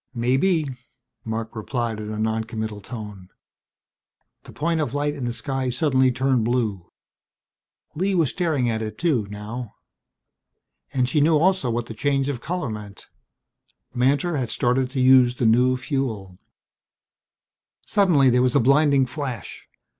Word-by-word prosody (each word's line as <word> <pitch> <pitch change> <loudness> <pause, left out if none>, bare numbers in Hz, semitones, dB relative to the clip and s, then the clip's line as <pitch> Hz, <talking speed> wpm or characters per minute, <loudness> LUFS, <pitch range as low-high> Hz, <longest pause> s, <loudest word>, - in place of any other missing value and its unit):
"Maybe," 135 +8 +2 0.6
Marc 110 0 -4
replied 115 0 -3
in 105 0 -5
a 110 - -4
noncommittal 110 -1 -3
tone. 105 -4 -9 1.2
The - - -11
point 165 +1 -1
of 145 - -3
light 145 0 0
in 140 -4 -5
the 120 - -1
sky 130 +3 -3
suddenly 130 -1 +2
turned 130 -1 +1
blue. 110 -6 -1 1.0
Lee 190 +5 0
was 165 -6 +2
staring 155 -8 0
at 110 -1 -1
it 110 -1 -5
too, 140 -12 0
now. 105 +3 -7 1.2
And 130 -2 +1
she 145 +4 +1
knew 155 +1 +4
also 185 -4 +2
what 120 0 -1
the 115 - -8
change 140 +3 0
of 130 -4 -4
color 170 -7 -3
meant. 105 -2 -9 0.8
Mantor 140 +7 +1
had 125 -4 -2
started 125 +1 +1
to 135 0 -4
use 130 -1 +5
the 125 - -1
new 125 +3 +4
fuel! 120 - -4 1.5
Suddenly 170 -11 +4
there 125 +1 +3
was 125 -1 +2
a - - +6
blinding 140 +2 +4
flash. 130 -5 -6
125 Hz, 145 wpm, -23 LUFS, 110-145 Hz, 1.5 s, a